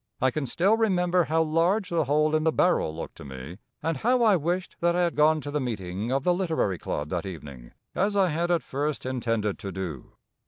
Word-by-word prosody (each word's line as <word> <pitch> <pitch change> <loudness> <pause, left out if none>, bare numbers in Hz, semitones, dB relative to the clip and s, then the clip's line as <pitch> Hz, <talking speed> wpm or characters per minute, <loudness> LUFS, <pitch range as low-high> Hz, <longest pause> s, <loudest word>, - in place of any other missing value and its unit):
I 130 0 +2
can 145 0 -2
still 195 - +2
remember 180 -5 +2
how 160 +2 +2
large 175 +6 +1
the 165 -3 +1
hole 150 +3 +2
in 155 - +1
the 160 - +3
barrel 155 - +2
looked 80 - -6
to - - -10
me, 70 +6 -9 0.2
and 165 -2 0
how 245 - +2
I 215 -3 +5
wished 175 +3 -2
that 170 0 +2
I 180 - +2
had 170 - +1
gone 155 +1 +4
to 145 - -6
the 150 0 -1
meeting 105 -2 -3
of 135 0 0
the 180 - +3
Literary 160 - 0
club 75 0 -3
that 85 0 -2
evening, 70 -9 -9 0.2
as 200 +2 0
I 195 -2 +3
had 170 +2 -1
at 170 -2 +2
first 145 +1 -3
intended 115 -5 -1
to 100 - -5
do. 85 -9 -6
155 Hz, 225 wpm, -26 LUFS, -, 0.2 s, I